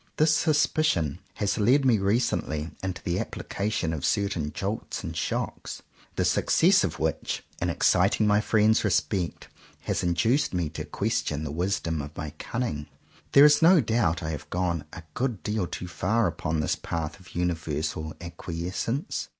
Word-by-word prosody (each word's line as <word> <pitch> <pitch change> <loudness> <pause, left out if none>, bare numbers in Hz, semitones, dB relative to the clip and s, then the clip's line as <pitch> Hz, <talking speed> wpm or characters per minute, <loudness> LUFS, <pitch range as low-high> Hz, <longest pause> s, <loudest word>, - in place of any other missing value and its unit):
This 155 +1 +4
suspicion 150 - +2 0.2
has 100 +1 -1
led 130 +7 +4
me 120 -5 +4
recently 95 -7 0
into 95 -2 -4
the 85 0 -1
application 100 -5 -2
of 75 -4 -4
certain 95 -7 0
jolts 100 +7 -4
and - - -5
shocks, - - -3 0.3
the - - +1
success - - +4
of - - -2
which, - - -2 0.2
in - - +1
exciting 110 - +3
my 105 0 +4
friends' 110 0 +3
respect, 90 -6 0 0.3
has - - -1
induced 90 - +1
me 85 -3 0
to 80 - -6
question 75 0 -1
the 75 - -4
wisdom 85 -2 -1
of 75 +2 -9
my 75 -1 -4
cunning. 115 -13 -3 0.5
There 140 - +9
is 150 0 +6
no 170 +2 +7
doubt 110 - +1
I 80 - -2
must 75 - -3
have - - -20
gone 85 -4 -1
a 90 - -9
good 125 -4 -2
deal 105 -4 -1
too 90 - -6
far 105 +6 +1
upon 80 -4 -1
this 75 - 0
path 80 +1 -4
of 95 -1 -16
universal 80 -2 -2
acquiescence. 85 - -4
90 Hz, 160 wpm, -27 LUFS, 80-110 Hz, 0.5 s, There